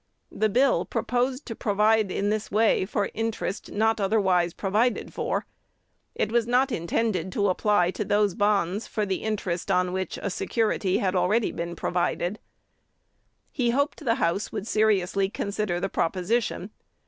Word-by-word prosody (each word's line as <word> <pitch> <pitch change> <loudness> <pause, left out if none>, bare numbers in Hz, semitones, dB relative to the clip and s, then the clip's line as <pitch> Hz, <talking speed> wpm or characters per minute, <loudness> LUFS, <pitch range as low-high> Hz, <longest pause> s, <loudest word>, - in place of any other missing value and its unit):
The 215 - +1
bill 255 +5 +3
proposed 255 +2 -1
to 225 - -6
provide 215 0 +2
in 200 +2 -1
this 215 0 -2
way 215 -2 +3
for 205 -1 -1
interest 225 -3 -3
not 220 +1 +1
otherwise 190 -4 +2
provided 215 +7 0
for. - - -2 0.7
It - - -1
was 235 -1 +2
not 255 +3 +2
intended 185 -1 -1
to 200 -1 +1
apply 185 -1 +2
to 210 - -3
those 205 -1 +2
bonds 205 0 +1
for 215 - -1
the 190 -1 -2
interest 190 -5 -3
on 180 0 +2
which 190 0 -3
a 200 - -3
security 210 -2 0
had 190 -1 0
already 195 +5 +2
been 170 +1 -5
provided. 175 +2 -1 1.1
"He 250 -4 0
hoped 285 +5 0
the 230 -4 +2
House 195 -4 -1
would 210 -2 -4
seriously 200 -3 +2
consider 200 -3 -2
the 195 - -1
proposition. 195 +3 -1
205 Hz, 150 wpm, -26 LUFS, 185-225 Hz, 1.1 s, bill